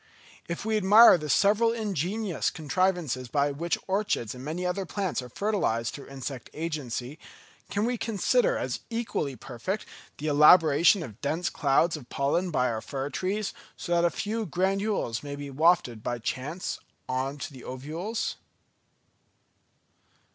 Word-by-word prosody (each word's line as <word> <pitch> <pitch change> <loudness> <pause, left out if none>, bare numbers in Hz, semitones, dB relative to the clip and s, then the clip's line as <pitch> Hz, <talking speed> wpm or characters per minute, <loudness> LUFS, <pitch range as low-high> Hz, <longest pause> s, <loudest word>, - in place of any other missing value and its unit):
If 170 +4 -4
we 220 -1 +1
admire 210 +4 +8
the 150 0 -5
several 215 +7 +4
ingenious 205 -3 -1
contrivances 160 -5 -1
by 145 +3 +1
which 165 +5 -1
orchids 195 - -1
and 125 0 -9
many 165 +5 -3
other 180 +2 -1
plants 190 -4 -2
are 125 - -9
fertilised 120 - -1
through 140 - -9
insect 135 -2 -6
agency, 150 -4 -4 0.5
can 205 +2 0
we 245 -1 -1
consider 485 - +2
as - - -3
equally 225 - -2
perfect 130 - -4 0.3
the 150 - -6
elaboration 155 +4 +6
of 110 -6 -10
dense 160 +5 -1
clouds 150 +4 +2
of 140 -6 -10
pollen 155 +7 0
by 125 -6 +1
our 110 -1 -3
fir 140 0 -4
trees, 195 +2 -2 0.2
so 175 - -6
that 170 0 +3
a 175 - +4
few 220 +4 -3
granules 190 - 0
may 145 -1 -6
be 145 -1 -7
wafted 150 -6 +2
by 120 - -2
chance 140 +9 -4 0.3
on 130 +2 -2
to 145 - -6
the 130 - -11
ovules? 160 - -4
165 Hz, 145 wpm, -27 LUFS, 135-195 Hz, 0.5 s, admire